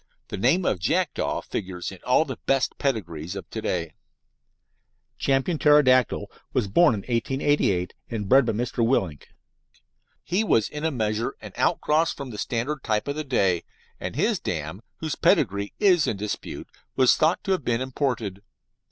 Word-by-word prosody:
The - - -4
name 145 - +2
of 95 - +1
Jackdaw 165 - 0
figures 90 -3 -5
in 95 - -11
all 125 +6 +3
the 130 - -6
best 135 -1 +2
pedigrees 90 - -2
of 100 - -7
to 110 - -4
day. 85 -6 -2 1.3
Ch. - - -4
Pterodactyl 135 - +4 0.3
was - - +1
born 135 - +4
in 100 - -4
1888, 120 -5 0 0.2
and 105 -4 -3
bred 135 +3 +5
by - - +1
Mr. 120 +1 -1
Willink. 95 - 0 1.0
He 185 +5 0
was 115 - +2
in 150 0 -6
a 160 - +2
measure 110 -5 -1
an - - -9
outcross 155 +2 +1
from 140 -3 -6
the 105 - -7
standard 130 +5 -2
type 105 +2 0
of 140 - -2
the 155 - -3
day, 95 - +1 0.4
and - - -5
his - - +1
dam, 80 +5 -4 0.2
whose 155 -1 -2
pedigree 100 -5 +2
is 185 -7 +4
in 100 - -1
dispute, 105 +1 -5 0.3
was 130 -2 +5
thought 160 +3 +2
to 195 - -2
have 185 -6 +1
been 115 -1 0
imported. 125 -7 -2
125 Hz, 165 wpm, -25 LUFS, 100-145 Hz, 1.3 s, bred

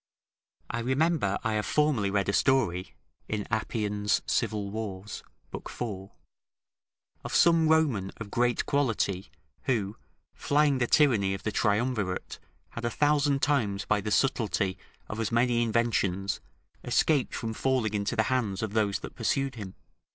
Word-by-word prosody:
I 120 - -2
remember 130 - +1
I 115 - 0
have 105 -1 0
formerly 145 -10 +2
read 100 -1 0
a 100 - +1
story 110 -11 +1 0.3
[In 105 -1 -2
Appian's 105 -2 0
Civil 100 -2 -1
Wars, 105 -2 -5 0.3
book - - -7
iv..] 100 -5 -4 1.1
of - - -4
some 165 -2 +5
Roman 145 -12 +2
of 105 -3 -8
great 120 0 +1
quality 115 -9 0 0.4
who, 105 -5 0 0.4
flying 145 -2 +2
the 120 - +1
tyranny 110 -11 +3
of 95 - -9
the 110 - -1
Triumvirate, 105 -3 -1 0.3
had 115 - -7
a 120 - +1
thousand 145 +1 +2
times 105 -9 +1
by 105 -1 +1
the 105 - -3
subtlety 105 -6 +1 0.3
of 110 - -5
as 115 - -1
many 120 0 +2
inventions 110 -5 0 0.4
escaped 150 -5 +1
from 115 -1 -3
falling 125 -3 0
into 100 -1 -1
the 110 - +3
hands 110 -6 -1
of 105 -2 -3
those 105 -3 +1
that - - -8
pursued 135 +4 0
him. 100 -6 -8
110 Hz, 145 wpm, -28 LUFS, 100-130 Hz, 1.1 s, some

